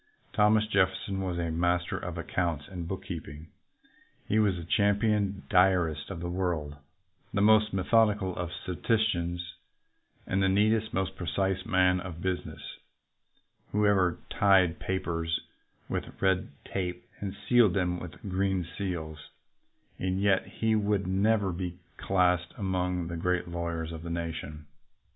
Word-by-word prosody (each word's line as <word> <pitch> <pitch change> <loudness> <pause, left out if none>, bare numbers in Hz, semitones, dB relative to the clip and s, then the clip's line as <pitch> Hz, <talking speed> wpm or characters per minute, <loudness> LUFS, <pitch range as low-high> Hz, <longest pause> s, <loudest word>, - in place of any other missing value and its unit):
Thomas 105 0 +4
Jeffer 95 -3 +2
son 95 -1 -3
was 90 -2 -2
a 85 -1 -1
master 90 +1 +1
of 90 -1 -5
accounts 80 -3 -2
and 90 -3 -6
bookkeeping. 80 -4 -6 0.8
He 110 - +2
was 105 -3 +3
the 85 - -6
champion 100 +1 +1
diarist 90 -5 +3
of 90 -4 -6
the 85 - -3
world, 85 -5 -2 0.5
the 100 - 0
most 110 +1 +5
methodical 100 -1 +2
of 90 -1 -4
statisticians, 90 -3 -1 0.7
and 95 +1 0
the 95 - +3
neatest, 110 +3 +2
most 95 0 -1
precise 95 +1 -1
"man 90 -3 +3
of 90 -3 -7
business" 95 0 -3 1.1
who 105 0 +3
ever 95 -4 +3
tied 95 -4 +4
papers 85 -3 -1 0.5
with - - -4
red 95 -1 +2 0.2
tape 90 -2 -3
and 100 -2 -4
sealed 120 -7 +5
them 90 -2 0
with 90 +5 -9
green 95 -1 0
seals; 80 -6 -5 0.7
and 95 0 -1
yet 100 -2 +2
he 110 +3 0
will 105 -1 +1
never 100 +1 +2
be 90 0 -4 0.2
classed 90 -2 +1
among 90 -3 -1
the 85 0 -4
great 90 +1 0
lawyers 85 -1 -3
of 80 -1 -7
the 85 - -6
nation. 80 -3 -4
90 Hz, 140 wpm, -29 LUFS, 85-100 Hz, 1.1 s, most